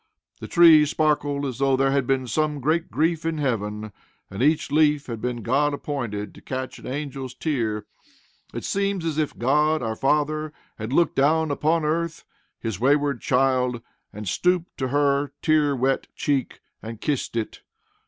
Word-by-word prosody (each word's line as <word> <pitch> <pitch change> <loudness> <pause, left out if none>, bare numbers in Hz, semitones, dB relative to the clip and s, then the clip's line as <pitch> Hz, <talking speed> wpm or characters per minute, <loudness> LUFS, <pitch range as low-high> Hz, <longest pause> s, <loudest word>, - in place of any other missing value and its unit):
The - - -7
trees 160 -4 +7
sparkled 145 -2 0
as 130 -2 -4
though 135 -1 +3
there 135 0 +2
had 135 -2 +1
been 135 -1 +1
some 150 +4 -1
great 160 +5 0
grief 160 +1 0
in 165 -1 -1
heaven, 110 -6 -2 0.4
and 100 +4 -5
each 150 +1 +2
leaf 150 -1 +3
had 115 -3 -6
been 120 -2 -3
God 145 +5 +1
appointed 120 -9 -4
to - - -15
catch 130 0 -5
an - - -10
angel's 135 -2 -5
tear. 115 -9 -2 0.7
It - - -6
seemed 200 -2 -1
as 160 -2 -1
if 150 - -2
God 150 +3 +2
our 110 -1 -2
Father 150 +3 0 0.3
had 110 +2 -5
looked 170 +5 +2
down 155 +3 +3
upon 155 +2 +1
earth, 165 +1 -1 0.4
his 110 -5 -4
wayward 140 +1 +2
child, 125 -1 +1 0.3
and 105 0 -8
stooped 180 - 0
to 130 - 0
her 140 +1 +1
tear 150 -3 +3
wet 135 +1 0
cheek, 140 -4 -1 0.2
and 115 -1 -8
kissed 140 -5 -2
it. 115 -2 -3
140 Hz, 165 wpm, -24 LUFS, 125-155 Hz, 0.7 s, trees